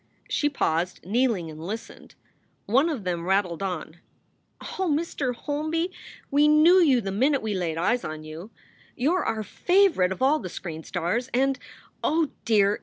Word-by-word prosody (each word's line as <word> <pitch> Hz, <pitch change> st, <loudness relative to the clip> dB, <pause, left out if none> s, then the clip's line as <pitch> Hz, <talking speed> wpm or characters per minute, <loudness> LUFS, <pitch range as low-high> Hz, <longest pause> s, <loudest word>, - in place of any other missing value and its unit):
She 295 Hz, -, +1 dB
paused, 175 Hz, -, -1 dB
kneeling, 210 Hz, -5 st, 0 dB
and 155 Hz, +1 st, -9 dB
listened. 215 Hz, +6 st, -7 dB, 0.5 s
One 270 Hz, +10 st, +3 dB
of 275 Hz, -10 st, -3 dB
them 175 Hz, -2 st, -2 dB
rattled 190 Hz, -3 st, +1 dB
on: 175 Hz, -4 st, -4 dB, 0.6 s
"Oh, 375 Hz, -4 st, -3 dB
Mr. 290 Hz, -5 st, -1 dB
Holby, 310 Hz, +6 st, -2 dB, 0.4 s
we 290 Hz, +2 st, +5 dB
knew 310 Hz, +5 st, +6 dB
you 270 Hz, -7 st, +4 dB
the 195 Hz, -2 st, -4 dB
minute 265 Hz, +7 st, +2 dB
we 215 Hz, -1 st, -1 dB
laid 170 Hz, -4 st, -2 dB
eyes 220 Hz, +9 st, +1 dB
on 155 Hz, 0 st, -6 dB
you. 160 Hz, +6 st, -9 dB, 0.5 s
You 290 Hz, +8 st, +1 dB
re 370 Hz, -, +1 dB
our 220 Hz, -1 st, -1 dB
fave 365 Hz, -, +2 dB
rite 180 Hz, 0 st, +3 dB
of 190 Hz, -, -4 dB
all 280 Hz, +4 st, +3 dB
the 185 Hz, -, -6 dB
screen 165 Hz, -3 st, -7 dB
stars, 185 Hz, +11 st, -2 dB
and 270 Hz, +1 st, +2 dB, 0.4 s
Oh 315 Hz, -2 st, +1 dB
dear! 205 Hz, -2 st, +3 dB
230 Hz, 170 wpm, -25 LUFS, 180-295 Hz, 0.6 s, knew